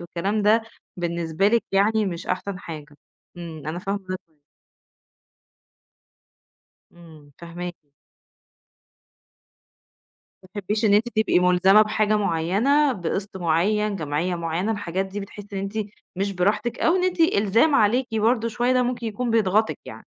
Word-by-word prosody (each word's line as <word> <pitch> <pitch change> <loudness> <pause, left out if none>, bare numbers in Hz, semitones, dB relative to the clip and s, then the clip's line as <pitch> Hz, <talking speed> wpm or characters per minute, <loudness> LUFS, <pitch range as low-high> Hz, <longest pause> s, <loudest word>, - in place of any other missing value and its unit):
والكلام 190 +5 -2
ده 220 +2 +4 0.3
بالنسبة 170 +1 0
لِك 230 +1 +2
يعني 210 +2 +2
مش 170 -1 -5
أحسن 185 +1 -3
حاجة. 150 -5 -9 0.4
امم، 165 -4 -8
أنا 160 +3 -3
فاهمة 195 +2 -2
وجهة - - -28 0.2
نظرِك. 155 -2 -37 2.5
امم، 160 -4 -16
فاهماكِ. 175 -2 -8 2.5
ما 185 - -17
بتحبيش 205 +3 -3
إن 205 - +5
أنتِ 220 +4 +3
تبقي 220 -5 +2
مُلزمة 180 +3 +5
بحاجة 215 0 +1
معيّنة 210 - +2
بقسط 195 0 -4
معيّن، 195 +5 +1
جمعية 160 +3 -2
معيّنة، 170 +5 -2
الحاجات 190 -2 -3
دي 200 +2 -6
بتحسي 205 +1 -10
إن 195 - -3
أنتِ 200 +3 -4 0.4
مش 195 +1 -1
براحتك 210 +6 0
أو 340 +3 +3
إن 365 - +1
أنتِ 365 -1 -1
إلزام 230 0 +3
عليكِ 245 +2 +3
برضو 225 +1 +2
شوية 240 +2 0
ده 255 0 +3
ممكن 245 -1 -2
يكون 230 +3 -3
بيتغطِك 215 -1 +2
يعني؟ - - -10
200 Hz, 135 wpm, -23 LUFS, 175-220 Hz, 2.5 s, إن